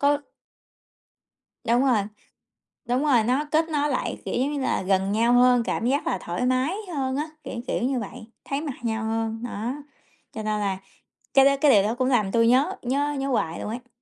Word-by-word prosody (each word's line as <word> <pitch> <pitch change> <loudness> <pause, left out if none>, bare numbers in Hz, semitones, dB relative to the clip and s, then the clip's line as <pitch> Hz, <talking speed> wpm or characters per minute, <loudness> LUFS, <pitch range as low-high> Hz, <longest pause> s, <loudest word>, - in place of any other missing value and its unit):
có 285 0 +3 1.5
Đúng 240 +3 +3
rồi, 240 -6 +3 0.9
đúng 250 +4 +1
rồi, 245 -7 +4
nó 260 +6 +1
kết 320 +1 +2
nối 295 -1 0
lại, 255 - -2
kiểu - - -3
giống 270 +4 0
như 285 - -2
là, 260 - 0
gần 190 +1 +1
nhau 230 +3 +3
hơn, 245 -1 +5
cảm 230 - -2
giác 275 +4 0
là - - 0
thoải 175 +7 -3
mái 255 +6 +1 0.2
hơn 265 -1 -1
á, 305 +2 -2
kiểu, - - -7
kiểu, - - -1
như 260 0 0
vậy, 215 0 -8 0.2
thấy 275 +1 -2
mặt 295 -4 -4
nhau 225 -1 -1
hơn, 225 +1 -2
đó, 235 +1 -3 0.6
cho 220 - -6
nên 215 0 -1
là 195 -2 -1 0.6
cái 270 0 +6
đó 280 - +6
cái 295 - +6
điều 200 -5 +6
đó 220 +4 -1
cũng 255 0 0
làm 215 -6 +2
tui 230 0 +3
nhớ 270 +10 +3
nhớ 285 +4 0
nhớ 270 - -2
hoài 170 -9 -1
luôn - - -5
ấy. 245 +3 -6
245 Hz, 210 wpm, -25 LUFS, 220-275 Hz, 1.5 s, cái